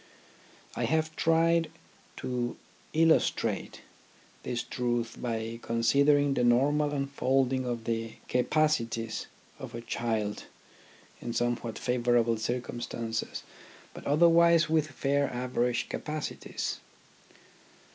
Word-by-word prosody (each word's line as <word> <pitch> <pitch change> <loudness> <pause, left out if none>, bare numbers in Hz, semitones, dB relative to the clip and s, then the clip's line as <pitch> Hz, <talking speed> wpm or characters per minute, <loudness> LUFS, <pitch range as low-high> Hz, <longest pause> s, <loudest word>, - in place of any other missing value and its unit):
I - - 0
have 155 0 0
tried 165 0 +3 0.5
to 125 -1 -3 0.3
illustrate 165 0 +2 0.6
this 120 -1 -3
truth 120 -2 -2
by 115 -1 -3
considering 140 +5 +3
the 125 - +1
normal 145 +5 +3
unfolding 135 -2 0
of 120 -2 -3
the 115 -1 -2
capacities 125 -5 0 0.3
of - - -8
a 115 - -5
child 110 -3 -2 0.8
in 120 - -4
somewhat 120 -1 -1
favourable 120 -2 +2
circumstances 120 0 -3 0.5
but - - -9
otherwise 170 +2 +5
with 155 -1 +2
fair 140 -1 0
average 125 -1 -1
capacities. 155 -1 -4
125 Hz, 95 wpm, -29 LUFS, 115-150 Hz, 0.8 s, otherwise